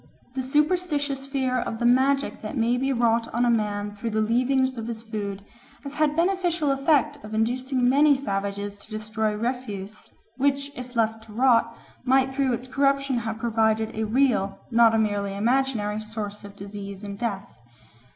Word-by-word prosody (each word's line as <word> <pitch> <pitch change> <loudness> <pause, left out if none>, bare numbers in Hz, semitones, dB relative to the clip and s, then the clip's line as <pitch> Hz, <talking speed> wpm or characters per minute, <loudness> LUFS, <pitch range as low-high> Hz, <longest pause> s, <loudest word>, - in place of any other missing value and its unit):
The 265 - -2
superstitious 290 -1 0
fear 260 -2 0
of 225 - -3
the 240 - -1
magic 265 +3 +2
that 215 +6 -5
may 235 +1 +2
be 265 +2 0
wrought 230 -2 +1
on 240 +1 +2
a 240 - +4
man 205 -2 -1
through 230 +3 -4
the 220 0 -1
leavings 255 +4 +2
of 230 -1 -5
his 225 -1 -5
food 205 -3 -5 0.4
has 280 -1 -6
had 300 0 +2
the - - -10
beneficial 345 -3 +1
effect 290 +1 +1
of 215 +1 -6
inducing 250 +3 +1
many 285 +3 +5
savages 200 -4 -3
to 210 - -16
destroy 215 0 -2
refuse 215 -3 -5 0.3
which, 280 +1 +1
if 250 0 -8
left 225 -1 0
to 215 - -13
rot, 235 -1 +3 0.3
might 265 +1 +3
through 265 -2 +1
its 245 +2 -4
corruption 275 -1 +1
have 225 -1 -4
proved 220 -1 +2 0.2
a 220 - -1
real, 220 -4 +1
not 230 -1 +5
a - - +3
merely 205 -2 0
imaginary, 225 -2 0
source 215 -1 -6
of 200 0 -11
disease 200 0 -8
and 200 -1 -7
death. 205 - -4
235 Hz, 175 wpm, -25 LUFS, 215-270 Hz, 0.4 s, many